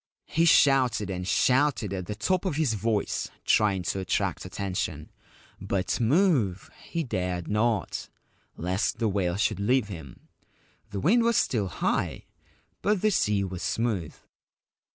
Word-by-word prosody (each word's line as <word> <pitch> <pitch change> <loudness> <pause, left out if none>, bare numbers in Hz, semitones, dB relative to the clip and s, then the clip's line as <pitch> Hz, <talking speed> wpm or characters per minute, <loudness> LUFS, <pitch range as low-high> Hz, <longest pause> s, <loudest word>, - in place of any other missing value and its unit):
He 165 +2 +1
shouted 130 - +4
and 90 -1 -4
shouted 130 -4 +2
at 95 -2 -4
the 105 - -4
top 180 - 0
of 185 -7 -1
his 150 -7 +1
voice, 110 0 -1 0.2
trying 100 -4 +3
to 95 - -2
attract 95 - -1
attention; 90 -6 -4 0.5
but 95 +1 -1
move 125 - +2
he 170 -1 -2
dared 90 - -3
not, 105 0 -1 0.5
lest 95 +6 -1
the 115 - 0
whale 95 -4 0
should 100 - 0
leave 115 +2 +1
him. 80 -10 -10 0.6
The 100 - -4
wind 220 - +4
was 235 -1 +2
still 105 -6 +1
high; 90 - -2 0.6
but 205 -1 +1
the 215 - +4
sea 105 - +1
was 95 -2 -5
smooth. 110 -9 -1
105 Hz, 140 wpm, -27 LUFS, 95-135 Hz, 0.6 s, shouted